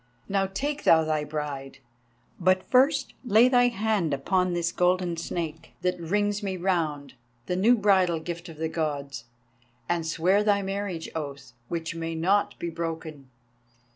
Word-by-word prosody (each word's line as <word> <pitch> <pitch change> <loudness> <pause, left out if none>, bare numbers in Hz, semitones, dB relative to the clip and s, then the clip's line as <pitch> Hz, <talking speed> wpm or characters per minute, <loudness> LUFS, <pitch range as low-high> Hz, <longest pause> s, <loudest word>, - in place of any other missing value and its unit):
Now 195 -1 +1
take 285 +10 -3
thou 160 -1 +6
thy 155 -1 0
Bride; 145 -3 -5 0.6
but 185 +1 +3
first 270 +2 +3
lay 235 0 +5
thy 245 -1 +5
hand 215 -9 0
upon 180 +6 0
this 170 0 0
golden 180 -1 +1
Snake, 165 -1 -5
that 180 -1 0
rings 205 +5 0
me 190 -2 -3
round, 160 -7 -1 0.3
the 180 - -1
new 225 +7 +4
bridal 190 -5 +3
gift 170 +2 -6
of 160 - -11
the 160 +1 -1
Gods, 145 -6 -3 0.6
and 175 -1 0
swear 180 +5 +2
thy 205 -1 +2
marriage 195 -3 -3
oath, 140 -6 -6
which 165 +1 -3
may 165 0 -4
not 190 +5 +1
be 170 - -4
broken. 160 -4 -5
175 Hz, 150 wpm, -26 LUFS, 160-200 Hz, 0.6 s, thou